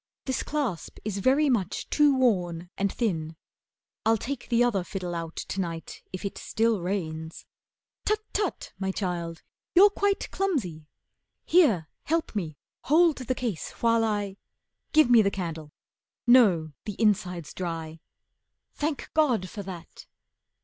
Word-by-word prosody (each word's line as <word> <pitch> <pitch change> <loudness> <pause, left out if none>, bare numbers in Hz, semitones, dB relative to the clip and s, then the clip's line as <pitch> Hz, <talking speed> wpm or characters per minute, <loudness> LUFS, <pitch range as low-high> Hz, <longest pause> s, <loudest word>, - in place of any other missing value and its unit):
This 260 - -1
clasp 260 - -3
is 205 -2 -2
very 270 +8 +4
much 210 -9 0
too 295 -3 +4
worn 180 -8 +1
and 200 0 0
thin. 165 -9 -2 0.7
I'll 225 +1 +4
take 260 +3 -5
the 240 0 +4
other 215 -7 +1
fiddle 180 -1 -5
out 165 -1 -5
to 195 - -3
night 165 -2 -6
If 185 +2 -6
it 200 - -4
still 225 -3 +1
rains. 160 -4 -4 0.6
Tut! 425 0 +1
Tut! 410 -3 -2
my 190 -1 -1
child, 175 -4 -3 0.3
you're 400 +3 +8
quite 405 0 0
Clumsy. 210 - -2 0.6
Here, 235 - +4 0.2
help 325 -5 -1
me, 160 -8 -3 0.3
hold 320 +1 +5
the 255 0 -2
case 230 -11 -3
while 230 -1 +2
I 205 -3 -1 0.5
Give 310 -3 +6
me 240 -2 +7
the 200 - +3
candle. 165 -6 -5 0.5
No, 200 -11 +5
the 210 -2 -6
inside's 185 -7 +1
dry. 165 -3 -5 0.7
Thank 295 -1 -3
God 250 - +2
for 210 - -5
that! 180 -4 -9
200 Hz, 140 wpm, -27 LUFS, 175-255 Hz, 0.7 s, you're